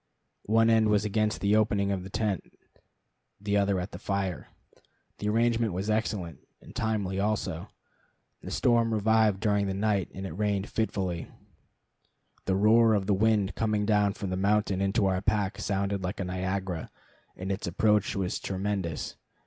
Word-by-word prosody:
One 115 Hz, +2 st, +4 dB
end 110 Hz, -1 st, +4 dB
was 105 Hz, 0 st, +2 dB
against 105 Hz, +1 st, 0 dB
the 100 Hz, +1 st, +3 dB
opening 100 Hz, -2 st, +2 dB
of 95 Hz, -2 st, -1 dB
the 95 Hz, -, -8 dB
tent, 100 Hz, -2 st, -2 dB, 0.8 s
the 100 Hz, 0 st, -1 dB
other 100 Hz, -2 st, +2 dB
at 90 Hz, +3 st, -5 dB
the 90 Hz, -, -8 dB
fire. 100 Hz, -4 st, -2 dB, 0.7 s
The 105 Hz, -, -1 dB
arrangement 115 Hz, -1 st, +2 dB
was 95 Hz, +4 st, -2 dB
excellent, 100 Hz, -, -2 dB, 0.2 s
and -, -, -15 dB
timely 105 Hz, -4 st, -1 dB
also. 100 Hz, -5 st, -1 dB, 0.7 s
The -, -, -8 dB
storm 115 Hz, -2 st, +2 dB
revived 110 Hz, -1 st, +3 dB
during 105 Hz, -2 st, +1 dB
the 95 Hz, -, -2 dB
night, 100 Hz, -2 st, 0 dB
and 95 Hz, -, -7 dB
it 95 Hz, -, -5 dB
rained 100 Hz, 0 st, 0 dB
fitfully. 95 Hz, -6 st, -2 dB, 1.2 s
The 95 Hz, -, +1 dB
roar 110 Hz, +2 st, +5 dB
of 100 Hz, -2 st, 0 dB
the 100 Hz, -, +2 dB
wind 105 Hz, 0 st, +2 dB
coming 105 Hz, -2 st, 0 dB
down 105 Hz, -2 st, +2 dB
from 100 Hz, -2 st, -5 dB
the 90 Hz, -, -1 dB
mountain 100 Hz, -1 st, +1 dB
into 100 Hz, +2 st, +1 dB
our 95 Hz, -1 st, +1 dB
park 105 Hz, -2 st, 0 dB
sounded 100 Hz, 0 st, -1 dB
like 95 Hz, +2 st, -4 dB
a 95 Hz, -, -2 dB
Niagara, 95 Hz, -1 st, -3 dB, 0.5 s
and 95 Hz, +2 st, -4 dB
its 95 Hz, -1 st, -3 dB
approach 105 Hz, +3 st, +2 dB
was 95 Hz, -2 st, -2 dB
tremendous. 95 Hz, -4 st, -3 dB
100 Hz, 165 wpm, -28 LUFS, 95-110 Hz, 1.2 s, roar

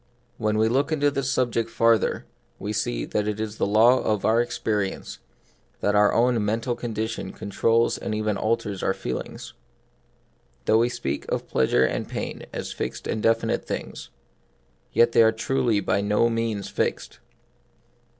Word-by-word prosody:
When 110 Hz, -1 st, 0 dB
we 110 Hz, +1 st, +3 dB
look 135 Hz, +6 st, +1 dB
into 145 Hz, -2 st, +2 dB
this 140 Hz, -1 st, -2 dB
subject 115 Hz, -2 st, 0 dB
farther, 115 Hz, -1 st, +2 dB, 0.3 s
we 105 Hz, +2 st, -4 dB
see -, -, -1 dB
that 105 Hz, 0 st, -1 dB
it 105 Hz, 0 st, -2 dB
is 110 Hz, 0 st, -4 dB
a -, -, +2 dB
law 115 Hz, +5 st, +5 dB
of 105 Hz, -2 st, 0 dB
our 115 Hz, +2 st, +4 dB
experience 105 Hz, -4 st, -3 dB, 0.6 s
that 105 Hz, -, +1 dB
our 105 Hz, 0 st, +5 dB
own 120 Hz, -1 st, +2 dB
mental 115 Hz, +4 st, -1 dB
condition 115 Hz, -1 st, -4 dB
controls 115 Hz, +3 st, +1 dB
and 110 Hz, -, -3 dB
even 105 Hz, -1 st, 0 dB
alters 110 Hz, -3 st, -1 dB
our 95 Hz, -, 0 dB
feelings. 65 Hz, -, -6 dB, 1.1 s
Though 110 Hz, -, +4 dB
we 120 Hz, +1 st, +3 dB
speak 70 Hz, -, -4 dB
of -, -, -2 dB
plea 65 Hz, -, +1 dB
sure 65 Hz, -, +3 dB
and -, -, -2 dB
pain -, -, -5 dB
as -, -, -5 dB
fixed -, -, -5 dB
and 110 Hz, -, -2 dB
definite 115 Hz, +1 st, +1 dB
things, -, -, -5 dB, 0.8 s
yet 120 Hz, -, +4 dB
they 115 Hz, -, +5 dB
are 110 Hz, 0 st, +6 dB
truly 115 Hz, -1 st, 0 dB
by 100 Hz, -, 0 dB
no 105 Hz, +3 st, +2 dB
means 115 Hz, -3 st, -2 dB
fixed. -, -, -3 dB
110 Hz, 160 wpm, -25 LUFS, 105-115 Hz, 1.1 s, are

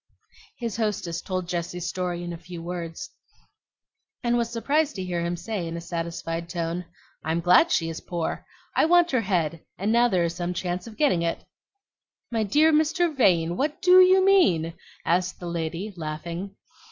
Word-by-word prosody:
His 230 Hz, -4 st, -4 dB
hostess 205 Hz, -7 st, -2 dB
told 185 Hz, -2 st, -3 dB
Jessie's 175 Hz, 0 st, -3 dB
story 180 Hz, -1 st, -3 dB
in 175 Hz, 0 st, -5 dB
a -, -, -6 dB
few 175 Hz, 0 st, -9 dB
words, 170 Hz, -1 st, -6 dB, 1.1 s
and 240 Hz, 0 st, +2 dB
was 235 Hz, -1 st, 0 dB
surprised 285 Hz, +6 st, 0 dB
to 190 Hz, -, -4 dB
hear 175 Hz, -2 st, -2 dB
him 170 Hz, +1 st, -2 dB
say 200 Hz, -3 st, -4 dB
in 165 Hz, 0 st, -4 dB
a -, -, -4 dB
satisfied 170 Hz, 0 st, -4 dB
tone, 170 Hz, 0 st, -3 dB, 0.4 s
"I'm 160 Hz, +2 st, 0 dB
glad 180 Hz, -, +5 dB
she 165 Hz, -, +2 dB
is 165 Hz, 0 st, -5 dB
poor. 170 Hz, -2 st, -3 dB, 0.3 s
I -, -, +4 dB
want 345 Hz, +1 st, +4 dB
her 255 Hz, -3 st, +2 dB
head, 170 Hz, -5 st, -1 dB
and 200 Hz, +3 st, 0 dB
now 240 Hz, +1 st, +5 dB
there 185 Hz, -7 st, +1 dB
is 170 Hz, 0 st, -1 dB
some 175 Hz, +1 st, -3 dB
chance 180 Hz, +2 st, -3 dB
of 220 Hz, -, -11 dB
getting 275 Hz, -, +3 dB
it." 170 Hz, 0 st, -2 dB, 0.9 s
"My 225 Hz, -2 st, 0 dB
dear 300 Hz, +10 st, +4 dB
Mr. 315 Hz, +2 st, +2 dB
Vane, 175 Hz, -9 st, +3 dB
what 295 Hz, +2 st, -1 dB
DO 365 Hz, 0 st, +8 dB
you 375 Hz, +1 st, +6 dB
mean?" 180 Hz, -, +4 dB, 0.3 s
asked 180 Hz, +2 st, +1 dB
the 175 Hz, -, -7 dB
lady, 170 Hz, +4 st, -3 dB
laughing. 170 Hz, +4 st, -5 dB
180 Hz, 175 wpm, -25 LUFS, 170-235 Hz, 1.1 s, DO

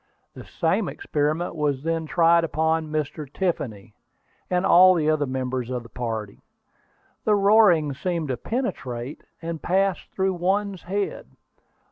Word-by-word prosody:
The -, -, -11 dB
same -, -, 0 dB
experiment 155 Hz, -, -2 dB
was 145 Hz, -3 st, -1 dB
then 165 Hz, 0 st, -1 dB
tried 170 Hz, +1 st, +4 dB
upon 160 Hz, 0 st, 0 dB
Mr. 150 Hz, -2 st, -3 dB
Tiffany, 120 Hz, -, -3 dB, 0.6 s
and 180 Hz, 0 st, +1 dB
all 185 Hz, +1 st, +7 dB
the 155 Hz, -3 st, 0 dB
other 150 Hz, -2 st, 0 dB
members 130 Hz, -1 st, -3 dB
of 125 Hz, -2 st, -3 dB
the 115 Hz, -, -14 dB
party. 110 Hz, -3 st, -5 dB, 0.8 s
The 215 Hz, -, +3 dB
roaring 200 Hz, -7 st, +4 dB
seemed 165 Hz, +1 st, -3 dB
to 130 Hz, -, -1 dB
penetrate, 135 Hz, -, -4 dB, 0.2 s
and 165 Hz, -1 st, -4 dB
pass 190 Hz, 0 st, +1 dB, 0.2 s
through 190 Hz, 0 st, +1 dB
one's 190 Hz, +2 st, -1 dB
head. 200 Hz, +3 st, -3 dB
160 Hz, 135 wpm, -24 LUFS, 135-185 Hz, 0.8 s, all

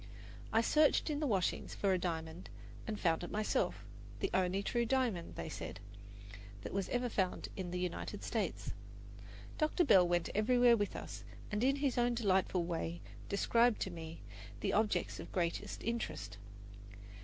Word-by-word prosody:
I 225 Hz, -, +4 dB
searched 300 Hz, +5 st, +4 dB
in 290 Hz, -, -1 dB
the 300 Hz, -, 0 dB
washings 195 Hz, -6 st, 0 dB
for 195 Hz, -2 st, +2 dB
a 185 Hz, -, +1 dB
diamond 165 Hz, 0 st, -4 dB, 0.4 s
and 215 Hz, -1 st, -3 dB
found 165 Hz, -1 st, +2 dB
it 175 Hz, -, -4 dB
myself 215 Hz, 0 st, 0 dB, 0.3 s
the 390 Hz, -, -1 dB
only 190 Hz, +1 st, +2 dB
true 235 Hz, +3 st, +1 dB
diamond, 235 Hz, -8 st, 0 dB
they -, -, -4 dB
said, 155 Hz, -, -6 dB, 0.8 s
that -, -, -5 dB
was 195 Hz, -1 st, -1 dB
ever 245 Hz, 0 st, 0 dB
found 190 Hz, -6 st, -1 dB
in 185 Hz, -2 st, -4 dB
the 180 Hz, -, -3 dB
United 180 Hz, -1 st, -3 dB
States. -, -, -2 dB, 0.9 s
Dr. 310 Hz, +3 st, +3 dB
Bell 185 Hz, -, +6 dB
went 175 Hz, -1 st, +1 dB
everywhere 245 Hz, +2 st, +5 dB
with 205 Hz, -3 st, -1 dB
us -, -, -7 dB, 0.3 s
and 210 Hz, +2 st, 0 dB
in 270 Hz, +2 st, +4 dB
his 280 Hz, -3 st, 0 dB
own 240 Hz, 0 st, +2 dB
delightful 190 Hz, -5 st, +2 dB
way 170 Hz, 0 st, -3 dB, 0.3 s
described 230 Hz, +3 st, +3 dB
to 190 Hz, -, -1 dB
me 165 Hz, -1 st, -8 dB, 0.4 s
the -, -, 0 dB
objects 215 Hz, 0 st, +1 dB
of -, -, -8 dB
greatest 170 Hz, -2 st, -2 dB
interest. 230 Hz, -, -3 dB
200 Hz, 160 wpm, -35 LUFS, 175-240 Hz, 0.9 s, Bell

